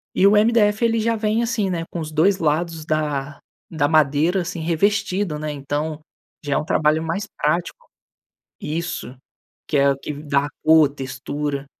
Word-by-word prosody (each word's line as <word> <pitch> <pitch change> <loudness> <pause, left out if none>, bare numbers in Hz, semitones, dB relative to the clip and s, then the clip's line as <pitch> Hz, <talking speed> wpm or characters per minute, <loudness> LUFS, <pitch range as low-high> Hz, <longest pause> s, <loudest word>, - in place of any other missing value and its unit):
E 195 - +5
o - - +5
MDF 215 0 +3
ele 230 0 +2
já 230 +1 +1
vem 215 +1 0
assim, 230 -4 0
né, 170 -2 -2
com 175 - -5
os 155 -1 -5
2 175 +6 +3
lados 160 +1 -1
da 150 -2 -2 0.3
da 155 -3 +1
madeira, 155 +4 +3
assim, 170 0 -5
revestido, 190 0 0
né. 155 0 -3
Então, 145 +2 -3 0.5
já 145 - -1
é - - +2
um - - -2
trabalho 155 0 +2
mais 170 +5 -2 0.2
prático 170 - -1 0.7
Isso. 155 -5 -4 0.5
Que 150 - -1
é 140 0 +4
o - - -6
que 150 - -5
dá 145 -1 -1
a - - -6 0.2
cor, 160 -2 +6
textura. 140 +1 -5
160 Hz, 175 wpm, -21 LUFS, 145-195 Hz, 0.7 s, cor